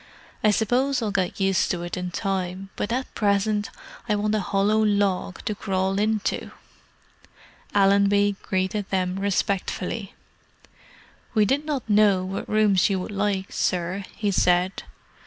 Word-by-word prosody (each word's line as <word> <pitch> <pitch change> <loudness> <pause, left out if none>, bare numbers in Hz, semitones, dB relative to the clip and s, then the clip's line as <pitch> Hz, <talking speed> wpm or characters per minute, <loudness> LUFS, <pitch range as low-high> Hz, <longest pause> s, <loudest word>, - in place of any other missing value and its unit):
"I 215 - +5
suppose 250 +6 +1
I'll 210 - -1
get 190 -2 -1
used 195 -1 +2
to 175 -1 -2
it 175 - -4
in 180 0 -3
time, 190 +1 -3
but 205 - -3
at 255 +2 -2
present 205 0 +1 0.4
I 210 - +3
want 210 +1 0
a 215 - +2
hollow 200 +2 +1
log 200 -3 0
to 215 - 0
crawl 195 -1 -1
into!" 215 -1 -1 1.3
Allenby 200 0 +4
greeted 190 +1 -2
them 185 -1 -1
respectfully. 200 +1 -2 1.2
"We 215 -1 +5
did 275 +7 0
not 290 -6 -3
know 205 -3 +4
what 190 +1 -5
rooms 215 -3 +3
you 195 -1 0
would 185 - -5
like, 200 -1 -1
sir," 180 +2 -1
he 205 -2 -1
said. 180 0 +2
200 Hz, 140 wpm, -24 LUFS, 190-210 Hz, 1.3 s, I